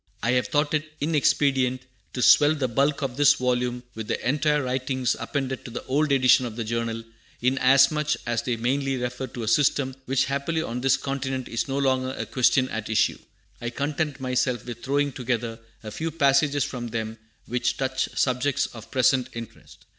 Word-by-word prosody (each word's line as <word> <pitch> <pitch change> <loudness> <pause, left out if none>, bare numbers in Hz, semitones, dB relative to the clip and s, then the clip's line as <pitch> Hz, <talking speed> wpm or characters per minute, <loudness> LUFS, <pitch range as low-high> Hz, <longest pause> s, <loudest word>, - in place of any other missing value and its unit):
I 115 - +2
have 125 0 +1
thought 145 0 0
it 155 0 -2
inexpedient 135 -4 +1 0.3
to 125 - -1
swell 150 +1 +6
the 135 -4 -1
bulk 140 +5 +1
of 130 -2 -3
this 145 0 +6
volume 125 -1 -1
with 110 -1 -6
the - - -2
entire 150 +1 +2
writings 130 0 -1
appended 135 -3 -3
to - - -8
the 120 - -6
old 145 +3 +1
edition 130 -2 +4
of 110 - -8
the 115 - -3
Journal, 115 0 -3 0.4
inasmuch 135 +4 +3
as 120 -1 0
they 125 - -1
mainly 135 +3 0
refer 125 +1 -4
to 120 - -7
a - - -4
system 135 +2 +2
which 135 +1 +1
happily 140 +4 -1
on 125 -2 -4
this 135 0 +3
continent 135 -2 -3
is 115 - -2
no 135 0 -2
longer 130 -1 0
a - - -3
question 130 0 +2
at 110 -1 -5
issue. 110 - +1 0.4
I 120 - -2
content 145 +3 -2
myself 125 -1 -1
with 120 -1 -7
throwing 140 +1 +1
together 120 -3 -3 0.2
a 110 - -7
few 160 +8 -3
passages 145 -2 +2
from 125 -4 -5
them 110 -1 -4 0.3
which 125 +1 -1
touch 130 -1 -1
subjects 130 +1 +1
of 115 -3 -10
present 130 0 +2
interest. 115 -1 -11
130 Hz, 185 wpm, -25 LUFS, 120-140 Hz, 0.4 s, swell